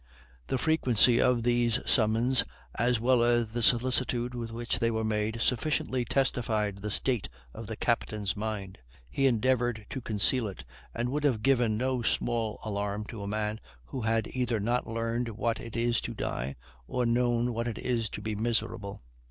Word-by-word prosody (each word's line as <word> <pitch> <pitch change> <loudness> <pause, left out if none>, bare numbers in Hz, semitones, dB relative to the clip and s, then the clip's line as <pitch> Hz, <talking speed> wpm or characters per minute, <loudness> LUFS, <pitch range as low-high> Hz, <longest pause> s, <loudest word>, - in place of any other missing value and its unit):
The - - 0
frequency 125 -5 +3
of 125 -2 +3
these 120 -1 +3
summons, 115 +2 +4 0.3
as 120 +1 +1
well 125 +1 +3
as 120 -1 +2
the 120 +2 -3
solicitude 125 0 +2
with 115 -2 -5
which 115 +1 -2
they 115 -1 +2
were 110 -1 -1
made, 110 +1 -1
sufficiently 130 -1 0
testified 110 -6 0
the 105 +2 -4
state 110 - 0 0.2
of 115 - -8
the 110 - -4
captain's 105 -3 -1
mind; 105 -3 -4 0.3
he 135 - +2
endeavored 120 -2 +1
to 130 - -4
conceal 115 +2 +2
it, 95 -8 -8 0.3
and 120 +1 -1
would 145 +3 -2
have 120 -7 +1
given 120 -5 +3
no 130 +1 0
small 115 -1 -1
alarm 105 0 -2
to 110 -4 -7
a 100 - -5
man 105 +1 -2 0.3
who 130 - -5
had 115 -1 +1
either 125 -3 -1
not 120 +4 0
learned 115 +1 -2
what 115 +1 -1
it 115 0 -7
is 120 0 +1
to - - -5
die, 65 +3 -3 0.3
or 125 -1 0
known 120 0 +1
what 115 +1 -2
it 115 -2 -3
is 115 -4 -1
to - - -7
be 110 - -2
miserable. 105 - -2
115 Hz, 175 wpm, -29 LUFS, 110-125 Hz, 0.3 s, summons